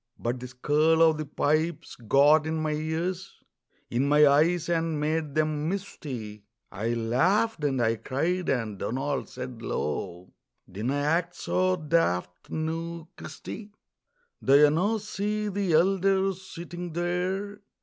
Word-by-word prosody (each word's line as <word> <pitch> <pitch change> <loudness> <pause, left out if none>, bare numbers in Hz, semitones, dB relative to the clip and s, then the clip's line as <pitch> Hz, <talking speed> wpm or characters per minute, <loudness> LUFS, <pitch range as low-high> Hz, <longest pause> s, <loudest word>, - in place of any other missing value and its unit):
But 120 +2 -2
the 125 - -7
skirl 150 +6 +3
o' 160 -1 +6
the 155 -1 -5
pipes 155 +4 -1
got 145 +6 +4
in 160 - -1
my 155 -1 -1
ears, 160 +4 -3 0.5
In 125 +4 +1
my 150 +1 +6
eyes, 160 +4 +3
and 165 -2 0
made 155 -1 -1
them 155 0 0
misty; 130 - -6 0.3
I 110 +4 -2
laughed 160 - +1
and 135 -3 +1
I 115 -1 +2
cried, 170 +10 -1
and 110 -7 -1
Donald 135 +6 -2
said 125 -2 -7
low: 90 -1 -4 0.3
"Dinna 110 +9 -3
act 165 +5 0
so 185 0 +1
daft, 150 - -1
noo, 165 +1 -4
Christy!" 210 +2 -9 0.7
"Do 135 - +5
ye 150 0 +7
no 200 +8 +1
see 210 0 -2
the 195 -3 -1
elder 195 +3 +3
sitting 175 -2 -8
there? 180 +4 -2
155 Hz, 135 wpm, -27 LUFS, 135-175 Hz, 0.7 s, ye